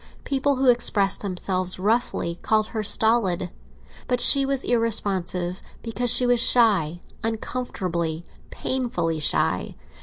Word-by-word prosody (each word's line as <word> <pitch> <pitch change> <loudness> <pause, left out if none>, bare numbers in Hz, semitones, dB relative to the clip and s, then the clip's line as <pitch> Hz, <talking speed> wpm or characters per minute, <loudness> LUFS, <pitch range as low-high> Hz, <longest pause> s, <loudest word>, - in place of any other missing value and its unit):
People 275 0 -1
who 260 0 0
expressed 205 -5 +1
themselves 185 -1 -2
roughly 200 -4 -2
called 215 -1 0
her 220 - -4
stolid. 205 -5 +1 0.6
But 250 -1 -1
she 270 +2 +5
was 275 -1 -1
irresponsive 190 -6 -1 0.2
because 240 +1 -2
she 250 - +3
was 245 -1 +2
shy, 200 -10 +3 0.2
uncomfortably, 180 -8 -3 0.2
painfully 175 -11 -3
shy. 150 - 0
215 Hz, 115 wpm, -23 LUFS, 180-245 Hz, 0.6 s, she